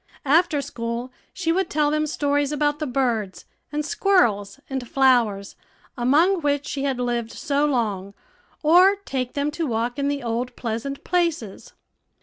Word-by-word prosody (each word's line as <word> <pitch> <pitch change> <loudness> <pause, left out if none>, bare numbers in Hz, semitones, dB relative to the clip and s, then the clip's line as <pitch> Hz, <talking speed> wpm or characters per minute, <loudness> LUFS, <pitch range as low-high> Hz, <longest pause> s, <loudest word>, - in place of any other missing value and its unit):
After 305 0 +3
school 240 -1 -5 0.2
she 335 -3 -1
would 375 +1 0
tell 295 -1 +1
them 305 0 0
stories 290 -1 0
about 295 0 0
the 305 - -2
birds, 235 -7 -1 0.3
and 300 0 -2
squirrels, 225 - +1
and 265 -3 -5
flowers, 235 -7 +2 0.4
among 315 +10 +3
which 285 -1 0
she 275 - -4
had 270 -2 0
lived 240 -2 -1
so 290 -1 0
long, 205 -7 -2 0.5
or 360 +6 +6
take 255 -2 -3
them 285 +1 -1
to 325 +1 -2
walk 235 +3 -2
in 280 - 0
the 285 -2 -2
old 240 +1 -3
pleasant 240 +4 -4
places. 335 - -2
275 Hz, 150 wpm, -23 LUFS, 235-300 Hz, 0.5 s, or